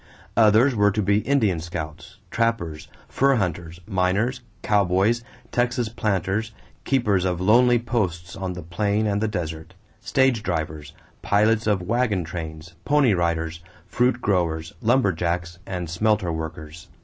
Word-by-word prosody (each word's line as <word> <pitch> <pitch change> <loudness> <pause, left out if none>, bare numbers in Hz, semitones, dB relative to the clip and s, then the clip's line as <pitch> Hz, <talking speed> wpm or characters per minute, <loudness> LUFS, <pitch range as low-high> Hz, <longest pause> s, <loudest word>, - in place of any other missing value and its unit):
Others 115 +5 +5
were 105 -2 +3
to 105 +2 -1
be 100 +2 +3
Indian 110 -9 +1
scouts, 80 -2 -7
trappers, 115 -10 -1 0.2
fur 135 0 +2
hunters, 85 -5 -3
miners, 105 +6 0 0.2
cowboys, 100 +3 +2 0.3
Texas 120 -1 0
planters, 105 -1 -1 0.3
keepers 105 -9 +2
of 90 -2 -1
lonely 120 +6 +5
posts 90 -8 -2
on 95 -1 -4
the 90 -1 -7
plain 100 +5 0
and 105 -1 0
the 110 - +1
desert, 80 -6 -5 0.2
stage 130 -4 +2
drivers, 80 -5 -4 0.3
pilots 110 +2 +2
of 100 -4 +1
wagon 110 -3 0
trains, 80 0 -7
pony 145 -6 +3
riders, 85 -2 -1 0.3
fruit 125 0 +1
growers, 80 -5 0
"lumber 120 -2 +3
jacks," 85 +1 -3
and 90 -2 -4
smelter 95 +1 +1
workers. 80 0 -7
95 Hz, 135 wpm, -23 LUFS, 85-115 Hz, 0.3 s, Others